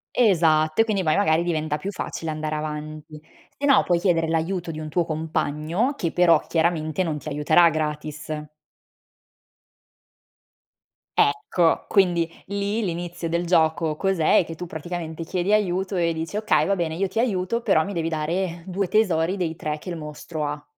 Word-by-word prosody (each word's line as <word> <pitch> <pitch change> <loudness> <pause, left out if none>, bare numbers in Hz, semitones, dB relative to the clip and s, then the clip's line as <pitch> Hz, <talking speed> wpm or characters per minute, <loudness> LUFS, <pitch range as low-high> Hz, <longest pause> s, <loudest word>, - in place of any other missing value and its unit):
Esatto, 160 -6 +3
e - - +6
quindi 205 -4 -1
poi 155 -1 +3
magari 170 -4 +3
diventa 155 -3 -1
più 195 +7 -5
facile 165 -3 -4
andare 155 0 -3
avanti. 155 0 -6 0.4
Se 285 - -7
no, 275 - +5
puoi 175 -1 +2
chiedere 170 -3 +2
l'aiuto 165 +2 -1
di 155 - -6
un 155 - -5
tuo 170 +3 +1
compagno, 160 - -1
che 170 -8 -1
però 170 -3 +5
chiaramente 160 0 +1
non 155 -3 -2
ti 155 - -8
aiuterà 155 +3 +4
gratis. 155 0 -3 2.8
Ecco, 160 +4 +2
quindi, 175 -4 +3 0.2
lì, 200 +3 -2
l'inizio 175 -1 -4
del 170 +1 0
gioco, 160 -2 +2
cos'è? 190 -3 +3
È - - +3
che 165 - -7
tu, 175 +2 -7
praticamente, 165 0 -5
chiedi 185 +3 -1
aiuto 190 -2 +1
e 170 -1 +2
dici: 160 +5 -4
“Okay, 215 0 +2
va 200 0 +1
bene, 165 -2 -1
io 195 +3 -1
ti 205 - -4
aiuto, 225 -1 0
però 175 -8 +3
mi 200 - -5
devi 165 -3 -1
dare 165 +2 -2
2 190 0 -2
tesori 185 -4 +2
dei 170 -4 -2
3 150 0 -3
che 180 - -8
il 170 - -4
mostro 150 0 -6
ha”. 145 0 -5
165 Hz, 170 wpm, -24 LUFS, 155-185 Hz, 2.8 s, e